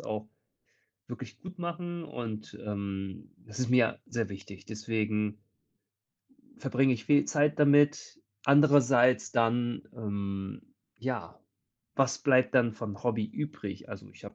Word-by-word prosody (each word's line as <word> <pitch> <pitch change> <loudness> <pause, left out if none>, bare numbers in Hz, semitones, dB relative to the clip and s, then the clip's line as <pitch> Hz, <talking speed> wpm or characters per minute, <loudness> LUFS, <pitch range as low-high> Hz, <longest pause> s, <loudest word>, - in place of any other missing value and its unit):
auch 110 0 -5 0.8
wirklich - - -8
gut 185 0 -10
machen 175 0 -4
und, 115 -8 -6
ähm, 100 -2 -5
das 110 +1 -11
ist 125 -2 0
mir 125 -2 +3
sehr 115 -3 -2
wichtig. 100 -1 -10
Deswegen 105 -1 -2 1.2
verbringe 135 -1 +2
ich 115 -3 -3
viel 145 -1 +5
Zeit 150 -1 +2
damit. 145 0 +4 0.2
Andererseits 140 -3 +5
dann, 120 +1 +1
ähm 100 -4 -4 0.4
ja, - - -4 0.6
was 135 0 +2
bleibt 130 -2 +3
dann 120 -3 +4
vom 105 -3 -7
Hobby 115 -3 0
übrig? 110 -6 -6
Also, - - -9
ich - - -18
habe - - -9
120 Hz, 125 wpm, -30 LUFS, 105-140 Hz, 1.2 s, viel